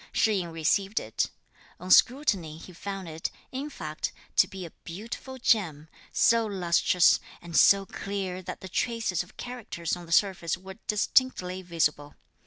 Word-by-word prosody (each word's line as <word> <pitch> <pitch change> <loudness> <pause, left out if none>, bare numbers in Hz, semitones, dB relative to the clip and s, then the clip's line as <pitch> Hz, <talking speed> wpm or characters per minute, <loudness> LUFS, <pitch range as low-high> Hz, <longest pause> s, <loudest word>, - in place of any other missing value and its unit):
Shih 215 -2 +2
yin 175 -2 -4
received 195 +6 +1
it. 110 - -2 0.5
On 185 +1 -5
scrutiny 200 - +4
he 180 +2 -12
found 195 +1 -6
it, 160 0 -4 0.2
in 275 +3 -4
fact, 155 - -4 0.3
to - - +6
be 190 -2 -7
a 165 - -9
beautiful 230 +8 -7
gem, 165 - +1 0.2
so 230 0 +4
lustrous 180 -2 +3 0.2
and 170 -1 -9
so 195 +3 +6
clear 190 -1 -4
that 180 - -7
the 190 - -7
traces 225 -2 -1
of 180 - -12
characters 225 -9 -4
on 175 -1 -10
the - - -11
surface 175 -2 +2
were 190 +3 -11
distinctly 210 -4 +1
visible. 155 -4 -1
185 Hz, 155 wpm, -28 LUFS, 170-210 Hz, 0.5 s, to